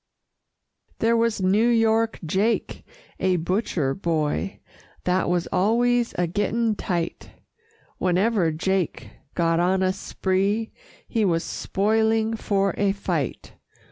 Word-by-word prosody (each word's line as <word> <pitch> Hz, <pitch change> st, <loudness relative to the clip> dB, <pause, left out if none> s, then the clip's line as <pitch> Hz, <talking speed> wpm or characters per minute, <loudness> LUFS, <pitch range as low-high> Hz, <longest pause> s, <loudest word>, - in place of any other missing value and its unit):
There 230 Hz, +1 st, +2 dB
was 230 Hz, -4 st, +1 dB
New 205 Hz, +5 st, +3 dB
York 225 Hz, -1 st, +2 dB
Jake, 200 Hz, +8 st, 0 dB, 0.4 s
a 185 Hz, -1 st, +2 dB
butcher 175 Hz, -5 st, -1 dB
boy, 165 Hz, +2 st, -2 dB, 0.4 s
That 180 Hz, 0 st, +1 dB
was 175 Hz, -1 st, +1 dB
always 235 Hz, +5 st, +2 dB
a 175 Hz, -, +2 dB
getting 210 Hz, +5 st, 0 dB
tight; 175 Hz, -4 st, -3 dB, 0.7 s
Whenever 185 Hz, -1 st, +2 dB
Jake 185 Hz, +2 st, -2 dB, 0.2 s
got 165 Hz, -1 st, +2 dB
on 185 Hz, +2 st, +2 dB
a 185 Hz, 0 st, +2 dB
spree, 195 Hz, +3 st, -1 dB, 0.4 s
He 225 Hz, -3 st, 0 dB
was 165 Hz, -4 st, +1 dB
spoiling 220 Hz, +2 st, +1 dB
for 200 Hz, -2 st, 0 dB
a 200 Hz, -1 st, +2 dB
fight. 175 Hz, -8 st, -3 dB
195 Hz, 110 wpm, -24 LUFS, 180-225 Hz, 0.7 s, New